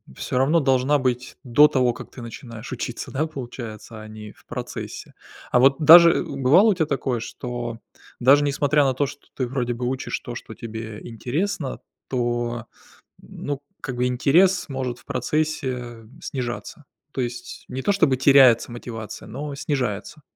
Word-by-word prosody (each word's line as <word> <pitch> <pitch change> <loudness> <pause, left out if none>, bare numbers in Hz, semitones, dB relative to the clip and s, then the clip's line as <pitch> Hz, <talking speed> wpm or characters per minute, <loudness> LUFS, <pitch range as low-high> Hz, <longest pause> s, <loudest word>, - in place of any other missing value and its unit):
всё 125 - -3
равно 150 +6 +4
должна 135 +1 +2
быть 125 0 -2
до 145 +4 +6
того, 130 -4 +2
как - - -10
ты 125 - -10
начинаешь 115 0 -9
учиться, 120 -1 -5
да, 145 +3 0
получается, 120 -6 -8
а 110 - -10
не 110 -1 -10
в - - -25
процессе. - - -7 0.4
А 125 - +4
вот 135 +1 +5
даже, 170 +2 +9
э, - - 0
бывало 140 - +4
у - - +3
тебя 165 -3 0
такое, 135 -4 -1
что 120 0 -5 0.4
даже 140 +4 +6
несмотря 145 +1 +2
на 135 -1 +2
то, 140 +2 0
что 140 - -12
ты 130 - -1
вроде 120 -1 -2
бы 125 +1 -4
учишь 130 0 -3
то, 120 - -8
что 110 - -8
тебе 110 -2 -7
интересно, 135 - -3 0.3
то, 120 -2 -1 0.6
м, - - -17 0.2
ну, 145 -1 -3 0.2
как 130 -3 -4
бы 125 +1 +1
интерес 170 +9 +3
может 130 -3 -3
в - - -20
процессе, 155 -2 -1
э, 120 -2 -9 0.2
снижаться? 130 +3 -5 0.3
То 130 - -3
есть 120 0 -5
не 130 +1 -5
то 205 - +2
чтобы 155 -9 +3
теряется 130 -3 +5
мотивация, 115 -3 -7
но 145 +1 -5
снижается. 140 0 -3
130 Hz, 170 wpm, -23 LUFS, 120-145 Hz, 0.6 s, даже